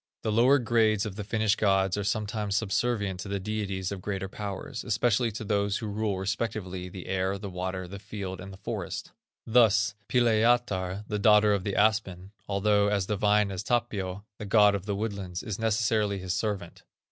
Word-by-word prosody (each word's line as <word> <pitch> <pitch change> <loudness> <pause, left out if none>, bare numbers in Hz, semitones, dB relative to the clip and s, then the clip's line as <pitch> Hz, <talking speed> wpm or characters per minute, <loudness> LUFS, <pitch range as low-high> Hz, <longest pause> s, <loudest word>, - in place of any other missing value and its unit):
The 110 - 0
lower 125 +6 +5
grades 110 -4 +2
of 105 -3 -5
the 105 - -5
Finnish 110 +1 +1
gods 95 -3 +2
are 105 - -2
sometimes 105 0 -1
subservient 105 -2 0
to 95 - -6
the 100 0 -2
deities 100 -2 -3
of 100 -2 -5
greater 95 0 -3
powers, 100 +4 -6
especially 120 +1 +1
to 110 +2 -5
those 100 -1 0
who 115 - -5
rule 105 -1 -1
respectively 95 -2 -3
the 90 0 -9
air, 95 +1 -1
the 100 -1 -7
water, 95 0 -4
the 100 +2 -8
field, 95 -2 -6
and 95 +1 -8
the 95 - -11
forest. 100 - -5 0.3
Thus, 110 -3 +4 0.2
Pilajatar, 110 -5 +2
the 105 - -2
daughter 105 0 +5
of 100 -2 0
the 100 -1 -2
aspen, 100 -3 +1 0.2
although 100 +1 +3
as 100 -2 +1
divine 105 0 +2
as 95 - -3
Tapio, 105 -4 -2
the 105 - -5
god 105 0 +5
of 100 0 -4
the 100 - -1
woodlands, 100 -4 -4
is 105 -2 -4
necessarily 110 -2 +1
his 95 -1 -3
servant. 100 -6 -3
105 Hz, 180 wpm, -28 LUFS, 95-110 Hz, 0.3 s, lower